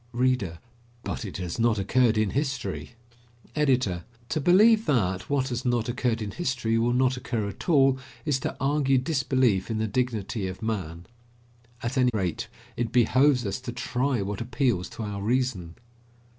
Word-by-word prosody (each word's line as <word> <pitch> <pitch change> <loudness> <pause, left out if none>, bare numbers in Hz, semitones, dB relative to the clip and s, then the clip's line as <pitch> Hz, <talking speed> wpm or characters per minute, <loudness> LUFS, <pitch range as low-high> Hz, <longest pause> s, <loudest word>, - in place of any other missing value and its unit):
READER: 120 -8 +1 0.5
But - - -4
it 95 - -6
has 90 +2 -4
not 115 -1 +3
occurred 115 +3 +2
in 110 -2 +1
history! 135 -3 -3 0.6
EDITOR: 130 - +1 0.3
To 155 - -1
believe 215 +7 +5
that, 95 -10 0
what 140 -2 +1
has 120 0 -3
not 120 -2 0
occurred 120 -2 -1
in 105 - -4
history 125 - -1
will 120 +1 +2
not 130 +1 +2
occur 115 -4 -2
at 100 - -7
all, 135 -4 +4 0.3
is 145 -4 +1
to - - -4
argue 135 0 +2
disbelief 130 - +1
in 110 - -1
the 110 - 0
dignity 110 -3 -2
of 95 +4 -7
man. 90 -6 -3 0.8
At 125 +3 -1
any 125 -1 +4
rate, 90 -5 -2 0.3
it 115 -2 -2
behoves 125 +2 +4
us 100 +5 -3
to 125 - -5
try 125 -1 -1
what 100 +1 -4
appeals 115 -5 0
to 115 - -7
our 100 -1 -4
reason. 110 -7 -1
120 Hz, 165 wpm, -26 LUFS, 105-130 Hz, 0.8 s, believe